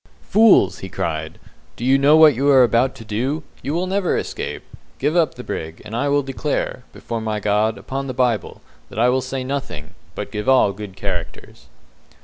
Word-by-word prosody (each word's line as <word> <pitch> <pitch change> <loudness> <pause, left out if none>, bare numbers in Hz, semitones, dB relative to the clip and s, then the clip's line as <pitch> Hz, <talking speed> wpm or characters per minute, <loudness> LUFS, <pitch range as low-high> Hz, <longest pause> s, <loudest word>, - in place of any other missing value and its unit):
"Fools!" 220 -1 +4
he 95 - -7
cried, 80 -3 -4 0.4
"do 120 - -5
you 130 +1 +5
know 140 +3 +5
what 155 -2 +8
you 135 +4 +1
are 135 -2 +7
about 125 +2 +2
to 115 - -11
do? 130 +9 -2 0.2
You 140 +5 -3
will 175 +2 0
never 190 -1 0
escape. - - -5 0.3
Give 145 +5 0
up 170 -3 +2
the 125 - -8
brig, 80 -6 -6
and 110 +1 -6
I 140 +4 0
will 145 0 +2
declare, 135 0 -3
before 115 -1 -5
my 110 -1 -2
God, 105 +2 +1
upon 135 +1 -5
the 130 - -5
Bible, 120 -5 -1 0.3
that - - -12
I 120 +2 +4
will 130 +1 +1
say 130 +1 -4
nothing, 130 - -5 0.2
but - - -5
give 105 +4 -2
all 130 -6 +4
good 100 -1 -9
characters." - - -6
130 Hz, 195 wpm, -20 LUFS, 105-140 Hz, 0.4 s, what